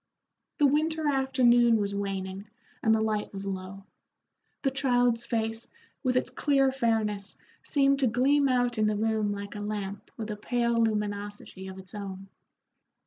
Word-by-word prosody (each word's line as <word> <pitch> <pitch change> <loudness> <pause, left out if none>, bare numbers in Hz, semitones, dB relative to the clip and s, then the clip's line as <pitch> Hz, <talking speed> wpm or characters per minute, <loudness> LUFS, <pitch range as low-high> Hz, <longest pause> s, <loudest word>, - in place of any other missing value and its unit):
The 295 - +4
winter 310 +2 +2
afternoon 250 -4 +4
was 200 -1 -1
waning 195 0 -4 0.3
and 220 -1 +4
the 220 - +1
light 215 -1 -1
was 195 0 -6
low; 195 0 -5 0.8
the 270 - +2
child's 245 -3 +2
face, 225 -1 -1 0.3
with 255 -2 +1
its - - 0
clear 275 -2 +2
fairness, 220 -5 -1 0.3
seemed 275 -2 +2
to 265 - +3
gleam 270 +4 +3
out 245 -2 +1
in 215 - +3
the 210 - +1
room 215 -1 +1
like 200 0 -5
a 210 - -6
lamp 205 -1 -4
with 220 -1 -4
a - - -3
pale 235 +1 +1
luminosity 205 -3 -3
of 190 0 -8
its 190 -1 -11
own. 195 -2 -7
220 Hz, 155 wpm, -28 LUFS, 200-255 Hz, 0.8 s, The